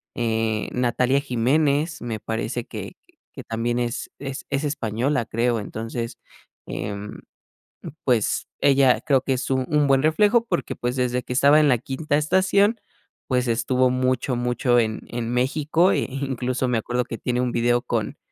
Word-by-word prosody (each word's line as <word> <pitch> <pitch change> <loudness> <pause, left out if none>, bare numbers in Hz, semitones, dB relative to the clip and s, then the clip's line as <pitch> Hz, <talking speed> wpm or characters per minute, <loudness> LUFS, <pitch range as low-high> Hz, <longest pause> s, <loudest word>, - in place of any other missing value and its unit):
eh, 110 -2 -1
Natalia 125 +2 +1
Jiménez, 145 +4 +1
me 115 -2 -4
parece 115 +2 -3
que - - -7 0.4
que - - -9
también 115 +2 -2
es 120 0 -3
es 135 -1 -6
es 140 +1 0
española, 130 -2 -1
creo. 115 +1 0
Entonces, 115 +3 -5 0.5
em, 100 0 -5 0.8
pues, 120 -5 +1
ella 135 -2 +4
creo 140 -4 +3
que 135 - 0
es 130 - -3
un 130 -1 +1
un 150 -1 +2
buen 135 -1 +3
reflejo, 210 +9 +3
porque 175 -6 -2
pues 120 +1 -2
desde 125 -1 0
que - - -6
estaba 140 +4 +5
en 150 - +4
La 125 -3 +4
Quinta 135 +4 -2
Estación, 190 +7 +2 0.5
pues, 125 -1 +1
estuvo 125 +2 +2
mucho, 130 0 0
mucho 120 0 +1
en 110 -1 -2
en 120 -1 -4
México, 150 +8 +2
e - - +1
incluso 130 -1 -2
me 120 -2 +1
acuerdo 125 +2 -1
que 115 - -6
tiene 125 0 -1
un 125 -1 0
video 120 +1 +2
con 115 -4 -3
125 Hz, 160 wpm, -23 LUFS, 120-140 Hz, 0.8 s, estaba